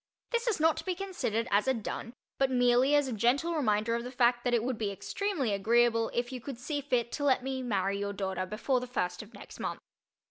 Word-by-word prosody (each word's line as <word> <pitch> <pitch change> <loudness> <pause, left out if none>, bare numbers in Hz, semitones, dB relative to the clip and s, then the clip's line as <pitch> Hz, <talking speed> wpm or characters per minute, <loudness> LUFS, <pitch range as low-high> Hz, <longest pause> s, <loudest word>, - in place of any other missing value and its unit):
This 470 0 0
is 440 -7 +1
not 320 0 +3
to - - -4
be 370 -2 -2
considered 345 - -2
as 205 +4 +3
a 265 - +3
"dun" 230 +1 -5 0.3
but 270 -1 +3
merely 250 +2 +4
as 290 -2 +3
a 255 - -3
gentle 250 +10 +2
reminder 220 -6 +1
of 235 0 -1
the 250 - -5
fact 240 -1 +2
that 245 - 0
it 230 - +1
would 250 -2 -2
be 210 -2 0
extremely 275 - -2
agreeable 230 +3 +3
if 240 +1 -2
you 255 -2 -6
could 260 +1 -6
see 285 +4 -3
fit 250 -4 0
to 290 - -3
let 265 -3 +3
me 265 0 -3
marry 200 -5 0
your 200 0 -2
daughter 190 -2 -3
before 240 +6 0
the 250 - -6
first 180 -7 -2
of 215 +2 -14
next - - -12
month. - - -3
245 Hz, 240 wpm, -30 LUFS, 220-270 Hz, 0.3 s, merely